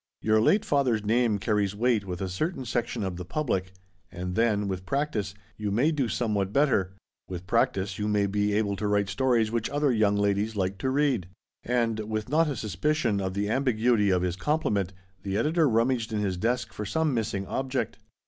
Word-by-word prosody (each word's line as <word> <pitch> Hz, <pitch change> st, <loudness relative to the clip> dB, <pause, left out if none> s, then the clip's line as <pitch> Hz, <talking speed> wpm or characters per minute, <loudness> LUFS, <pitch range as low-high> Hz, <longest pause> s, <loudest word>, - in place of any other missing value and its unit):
Your 110 Hz, 0 st, +4 dB
late 205 Hz, -, +3 dB
father's 125 Hz, -7 st, +1 dB
name 115 Hz, -1 st, +2 dB
carries 100 Hz, -1 st, 0 dB
weight 115 Hz, -2 st, +1 dB
with 90 Hz, -1 st, -5 dB
a 95 Hz, -, -1 dB
certain 130 Hz, -, -3 dB
section 120 Hz, -1 st, -2 dB
of 95 Hz, -2 st, -3 dB
the 90 Hz, -, -5 dB
public. 95 Hz, -, -2 dB, 0.4 s
And 90 Hz, +1 st, -5 dB
then, 105 Hz, -1 st, +1 dB
with 95 Hz, -1 st, -3 dB
practice, 110 Hz, -7 st, -1 dB, 0.2 s
you 105 Hz, -1 st, -2 dB
may 125 Hz, +11 st, +2 dB
do 140 Hz, -5 st, 0 dB
somewhat 105 Hz, -5 st, -1 dB
better. 105 Hz, -9 st, +2 dB, 0.3 s
With 90 Hz, -1 st, -6 dB
practice 95 Hz, +2 st, 0 dB
you 105 Hz, -, -1 dB
may 105 Hz, -1 st, +2 dB
be 105 Hz, +1 st, 0 dB
able 100 Hz, -1 st, +1 dB
to 105 Hz, -, -2 dB
write 100 Hz, -1 st, +1 dB
stories 115 Hz, +1 st, +2 dB
which 115 Hz, -2 st, -1 dB
other 145 Hz, -1 st, +1 dB
young 105 Hz, -3 st, +3 dB
ladies 100 Hz, +2 st, 0 dB
will 100 Hz, -, 0 dB
like 95 Hz, +1 st, -2 dB
to 130 Hz, -, -1 dB
read." 130 Hz, -, +1 dB, 0.4 s
And 115 Hz, -2 st, 0 dB
with 110 Hz, 0 st, -3 dB
not 160 Hz, +3 st, +3 dB
a 140 Hz, -, -2 dB
suspicion 110 Hz, -, 0 dB
of 95 Hz, -1 st, -3 dB
the 100 Hz, +1 st, 0 dB
ambiguity 120 Hz, -4 st, +2 dB
of 90 Hz, -1 st, +2 dB
his 90 Hz, -1 st, -1 dB
compliment, 105 Hz, -, 0 dB, 0.3 s
the 100 Hz, 0 st, -2 dB
editor 155 Hz, +2 st, +2 dB
rummaged 115 Hz, 0 st, +1 dB
in 110 Hz, -, -1 dB
his 100 Hz, -3 st, -1 dB
desk 120 Hz, +7 st, -1 dB
for 105 Hz, -, -5 dB
some 155 Hz, +7 st, 0 dB
missing 105 Hz, -4 st, -1 dB
object. 130 Hz, 0 st, -2 dB
110 Hz, 195 wpm, -27 LUFS, 100-125 Hz, 0.4 s, Your